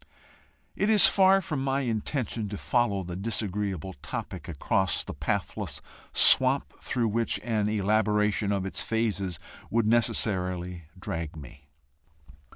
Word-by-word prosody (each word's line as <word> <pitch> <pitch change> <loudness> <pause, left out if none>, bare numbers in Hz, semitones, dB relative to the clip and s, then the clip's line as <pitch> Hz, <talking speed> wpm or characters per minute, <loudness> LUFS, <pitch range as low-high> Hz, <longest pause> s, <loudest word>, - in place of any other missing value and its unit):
It 200 - +1
is 215 -2 +7
far 195 0 +5
from 145 -5 -3
my 135 0 0
intention 115 -2 -2
to 100 - -5
follow 115 -6 +1
the 85 0 -6
disagreeable 100 -3 -2
topic - - -6
across 90 +4 0
the - - -7
pathless - - -3 0.3
swamp 130 +2 +4
through 120 -3 -1
which 115 +2 0
an 110 -3 0
elaboration 105 0 +1
of 100 -2 -1
its 95 - -2
phases 105 -6 -1 0.3
would 115 0 +1
necessarily 90 -6 0
drag 80 -3 -4
me. 70 -2 -12
105 Hz, 125 wpm, -27 LUFS, 95-120 Hz, 0.3 s, is